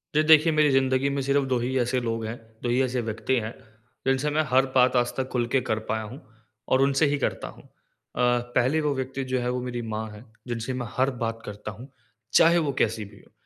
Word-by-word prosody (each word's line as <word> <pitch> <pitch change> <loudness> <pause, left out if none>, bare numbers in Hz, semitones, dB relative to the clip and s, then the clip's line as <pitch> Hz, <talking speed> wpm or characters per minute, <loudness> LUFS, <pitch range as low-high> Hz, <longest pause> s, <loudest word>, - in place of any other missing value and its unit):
ये 155 - +5
देखिए 160 +1 +6
मेरी 155 -1 +4
ज़िंदगी 135 0 +2
में 140 0 -1
सिर्फ़ 140 +1 +1
2 130 -1 0
ही 130 +2 -1
ऐसे 125 +1 +1
लोग 115 -1 -2
हैं, 110 +2 -5 0.3
2 120 - -1
ही 125 +2 +2
ऐसे 125 -1 0
व्यक्ति 115 +3 -1
हैं, 110 +1 -5 0.5
जिनसे 135 +2 +2
मैं 155 +1 +2
हर 130 +1 +4
बात 130 0 +4
आज 120 -1 +2
तक 130 -1 -2
खुल 120 -2 0
के 130 - +4
कर 110 0 +1
पाया 110 0 -1
हूँ 125 +8 -9 0.5
और 130 - +3
उनसे 140 +2 +3
ही 145 0 +1
करता - - -2
हूँ। - - -13
अ, - - -25 0.5
पहले 125 +4 +2
वो 150 -1 0
व्यक्ति 130 +1 -3
जो 130 - +1
है 125 0 -1
वो 125 0 -2
मेरी 120 -1 -4
माँ 110 +1 -3
है, 105 +2 -12 0.2
जिनसे 120 +1 -3
मैं 125 -2 -4
हर 130 +1 +3
बात 115 0 -3
करता 105 +1 -7
हूँ, 120 +7 -12 0.4
चाहे 170 +1 +6
वो 155 -4 +1
कैसी 110 -1 0
भी 100 0 -15
हो। - - -27
125 Hz, 235 wpm, -25 LUFS, 115-135 Hz, 0.5 s, देखिए